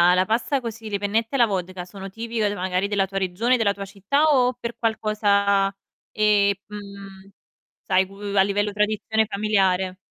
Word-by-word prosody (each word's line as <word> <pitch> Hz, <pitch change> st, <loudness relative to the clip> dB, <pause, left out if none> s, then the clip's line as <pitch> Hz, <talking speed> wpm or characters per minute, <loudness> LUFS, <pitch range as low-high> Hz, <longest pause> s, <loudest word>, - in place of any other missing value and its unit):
la 185 Hz, +1 st, +3 dB
pasta 230 Hz, +5 st, 0 dB
così, 225 Hz, -2 st, -7 dB
le 200 Hz, -, -1 dB
pennette 220 Hz, +5 st, -1 dB
alla 240 Hz, -3 st, +5 dB
vodka 185 Hz, -3 st, -4 dB
sono 195 Hz, +1 st, -9 dB
tipiche, 225 Hz, +1 st, -2 dB
uhm, 205 Hz, -, -2 dB
magari 185 Hz, +1 st, -1 dB
della 200 Hz, -2 st, +1 dB
tua 195 Hz, 0 st, -3 dB
regione, 210 Hz, +7 st, +1 dB
della 205 Hz, -3 st, +1 dB
tua 200 Hz, 0 st, -6 dB
città 200 Hz, +10 st, 0 dB
o 255 Hz, -5 st, +4 dB
per 235 Hz, -1 st, -6 dB
qualcosa, 205 Hz, -3 st, +1 dB, 0.4 s
ehm, 210 Hz, -2 st, +3 dB
mhmm, 200 Hz, -2 st, -10 dB, 0.5 s
sai, 185 Hz, 0 st, +2 dB
cu 195 Hz, -, -16 dB, 0.2 s
a 195 Hz, -, +6 dB
livello 205 Hz, +1 st, +1 dB
tradizione 215 Hz, +1 st, 0 dB
familiare? 190 Hz, -3 st, +1 dB
205 Hz, 165 wpm, -23 LUFS, 195-220 Hz, 0.5 s, a